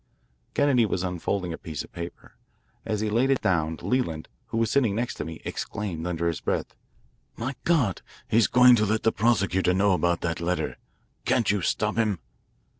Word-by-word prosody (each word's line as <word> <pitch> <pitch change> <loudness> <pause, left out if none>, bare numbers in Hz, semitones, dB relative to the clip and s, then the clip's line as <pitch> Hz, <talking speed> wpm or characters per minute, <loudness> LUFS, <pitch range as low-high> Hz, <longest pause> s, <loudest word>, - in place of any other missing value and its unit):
Kennedy 140 -4 +4
was 95 -4 -1
unfolding 90 0 -2
a - - -7
piece=20of 80 -3 -6
paper. 85 0 -8 0.5
As 105 -1 -1
he 110 - 0
laid 120 +5 +2
it 135 - +3
down, 80 -3 +1
Leland, 85 -12 -1 0.2
who - - -4
was 115 -1 +1
sitting 120 -7 +2
next 120 +2 -1
to - - -4
me, 80 -1 -8
exclaimed 90 -5 -4
under 85 -1 -1
his 85 -3 -1
breath: - - -2 0.6
"My 125 +4 -3
God, 140 - +2 0.3
he's 115 +1 +4
going 125 0 +7
to 110 - +2
let 110 +1 0
the 110 - +4
prosecutor 95 -5 +2
know 100 +1 +3
about 85 -2 +1
that 85 0 -2
letter. 90 +1 -1 0.5
Can't 120 -5 +2
you 105 -2 0
stop 105 +4 0
him?" 110 -4 +2
100 Hz, 180 wpm, -26 LUFS, 85-115 Hz, 0.6 s, going